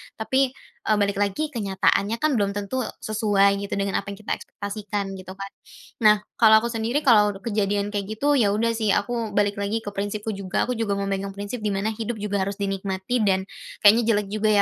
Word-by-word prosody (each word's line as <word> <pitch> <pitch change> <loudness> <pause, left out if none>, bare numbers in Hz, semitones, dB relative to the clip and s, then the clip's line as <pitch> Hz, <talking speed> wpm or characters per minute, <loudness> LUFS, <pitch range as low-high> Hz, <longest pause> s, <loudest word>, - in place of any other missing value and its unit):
Tapi, 240 +4 0 0.5
eee 215 - +4
balik 200 0 +1
lagi, 205 +10 0
kenyataannya 200 -1 +1
kan 310 - +3
belum 200 -1 +1
tentu 220 +4 -2 0.2
sesuai 200 -2 +2
gitu, 200 - -5
dengan 200 0 0
apa 200 - -10
yang 200 - -18
kita - - -4
ekspektasikan, 200 -1 -5
gitu 185 +1 -9
kan. 195 0 -7 0.5
Nah, 215 -2 +6 0.2
kalau 220 -1 +8
aku 235 - -1
sendiri, 235 +6 -1
kalau 210 -6 +5
kejadian 205 -2 0
kayak 200 -1 -3
gitu, 285 +4 +2
ya 205 -3 +3
udah 230 +2 +1
sih 220 -2 -1
aku 230 +1 -2
balik 205 0 +1
lagi 215 +3 -2
ke 205 - -5
prinsipku 205 +2 -3
juga, 195 -2 -2
aku 250 - -2
juga 205 -3 0
memegang 195 0 -3
prinsip 205 +4 -5
dimana 210 0 -1
hidup 225 +1 -4
juga 205 -2 -2
harus 200 - -3
dinikmati 195 +3 -2
dan, 190 -1 +2 0.4
kayaknya 220 +3 +7
jelek 205 -1 -1
juga 215 0 +1
205 Hz, 195 wpm, -24 LUFS, 200-220 Hz, 0.5 s, kalau